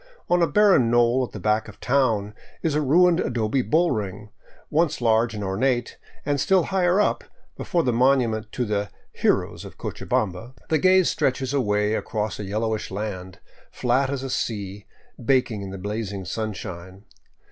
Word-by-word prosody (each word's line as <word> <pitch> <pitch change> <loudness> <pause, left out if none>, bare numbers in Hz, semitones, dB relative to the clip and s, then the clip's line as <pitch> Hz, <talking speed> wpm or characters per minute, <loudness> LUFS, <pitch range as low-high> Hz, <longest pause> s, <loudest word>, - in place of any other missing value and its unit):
On 175 0 +4
a 170 - +4
barren 185 - +4
knoll 120 +2 +3
at 125 - -5
the 105 - -7
back 105 +4 +1
of 110 - -11
the - - -11
town 115 -6 +1 0.3
is 160 - +1
a 150 - +1
ruined 170 +5 +4
adobe 120 +1 0
bull 165 +7 +2
ring, 105 -2 -4 0.4
once 160 0 +1
large 115 -1 +2
and 105 - -4
ornate, 120 +5 -1 0.3
and 145 -2 0
still 190 -2 +3
higher 185 0 +1
up, 210 - +1 0.3
before 170 -2 -1
the 125 - +1
monument 120 -3 +2
to 125 - -1
the 105 -1 -2
" - - -38
Heroes - - +1
of - - -11
Cocha - - -6
bamba," 110 +6 -1
the 160 - +2
gaze 185 +2 +4
stretches 130 0 -1
away 105 -5 +1
across 110 -2 -3
a - - -4
yellowish 110 +2 -2
land, 95 -2 -5 0.3
flat 130 +2 0
as 135 -1 -3
a 135 - -4
sea, 100 -4 -4 0.4
baking 125 -4 +1
in 100 - -6
the 95 - -7
blazing 100 0 -4
sunshine. 95 -1 -6
115 Hz, 175 wpm, -24 LUFS, 105-140 Hz, 0.4 s, On